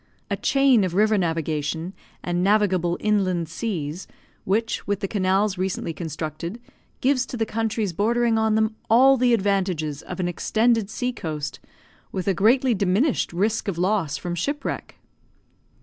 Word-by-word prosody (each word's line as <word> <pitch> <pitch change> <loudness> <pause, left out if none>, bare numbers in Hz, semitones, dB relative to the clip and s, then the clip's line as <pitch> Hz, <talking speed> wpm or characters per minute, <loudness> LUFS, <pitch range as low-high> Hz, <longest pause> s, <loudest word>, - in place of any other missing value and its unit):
A - - +2
chain 275 -6 +3
of 180 -2 -2
river 215 +2 +4
navigation 160 -1 -2 0.3
and 175 0 -1
navigable 190 -4 +2
inland 185 -5 +1
seas, 165 -3 -4 0.4
which, 225 +4 -1
with 200 -1 0
the 200 - -2
canals 195 0 +1
recently 185 -3 -2
constructed, 160 - -5 0.4
gives 260 -1 +2
to 245 - -6
the 225 - 0
countries 220 -3 -2
bordering 230 +4 +2
on 220 -1 +2
them 220 0 +1
all 265 +4 +6
the 250 -1 +2
advantages 190 -9 0
of - - -8
an 180 - 0
extended 220 +4 +1
sea 250 +3 -2
coast, 155 -9 -5 0.5
with 185 0 -4
a 195 - +3
greatly 240 +7 +3
diminished 205 +8 +1
risk 210 +6 0
of 190 -4 -2
loss 185 -4 0
from 175 - -4
shipwreck! 280 - -3
200 Hz, 150 wpm, -24 LUFS, 175-225 Hz, 0.5 s, all